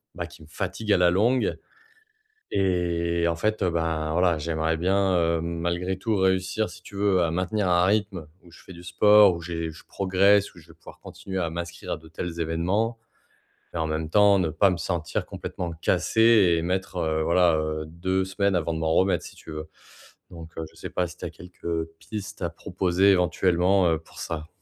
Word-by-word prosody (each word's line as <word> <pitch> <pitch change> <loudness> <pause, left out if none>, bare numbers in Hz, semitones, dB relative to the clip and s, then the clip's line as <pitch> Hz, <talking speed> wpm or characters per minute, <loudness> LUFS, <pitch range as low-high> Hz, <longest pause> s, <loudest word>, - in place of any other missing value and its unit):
bah, 85 - -4
qui 85 -1 -16
me - - -15
fatigue 105 +6 -4
à - - +4
la 90 -1 +4
longue 115 +8 +2 1.0
et 85 -3 +1
en 85 - 0
fait, 110 +5 -1
heu, 90 - +1
bah, 80 -2 -1
voilà, 90 -1 +2
j'aimerais 80 +1 -1
bien, 95 +2 +2
heu, 85 -1 +1
malgré 85 +2 -2
tout 110 +3 -1
réussir, 95 +2 +1
si 90 - -13
tu - - -12
veux, 100 -2 +2
à 80 - 0
maintenir 95 +4 -1
un 90 0 +4
rythme 100 -5 0 0.2
où 85 - -18
je - - -16
fais 95 - -12
du 85 0 -12
sport, 105 +3 +6
où 85 - -7
j'ai 85 -1 -4
je 80 - -14
progresse 100 +1 +2
ou - - -13
je 80 - -19
vais 80 - -15
pouvoir 80 - -15
continuer 95 -1 -6
à 85 -2 -1
m'inscrire 85 +2 -5
à - - -4
de 80 0 -16
tels 85 0 -6
événements 95 +8 -1 0.7
et - - -4
en 80 - -1
même 80 0 -3
temps 100 +1 +5
ne 90 - +1
pas 85 +6 +3
me 90 - -2
sentir 85 -2 -3
complètement 90 -2 -6
cassé 110 -5 +4
et - - 0
mettre, 95 +1 -2
heu, 80 -1 0
voilà, 85 -1 +3
heu, 80 0 -2
2 95 +4 -1
semaines 95 +1 0
avant 85 -1 0
de 80 - -3
m'en 80 0 0
remettre 95 +1 +2
si - - -11
tu - - -12
veux. 75 0 -6 0.6
Donc, 85 -2 -10
heu, 80 - -3
je - - -24
sais - - -7
pas 90 - -1
si 85 - -13
tu - - -7
as - - -3
quelques, 90 +1 -15
heu, 80 -1 -2
pistes 105 -2 -7
à 85 - 0
proposer 95 +4 +1
éventuellement, 90 0 +3
heu, 80 - 0
pour 80 - -16
ça? 80 -1 -5
90 Hz, 210 wpm, -25 LUFS, 85-95 Hz, 1.0 s, sport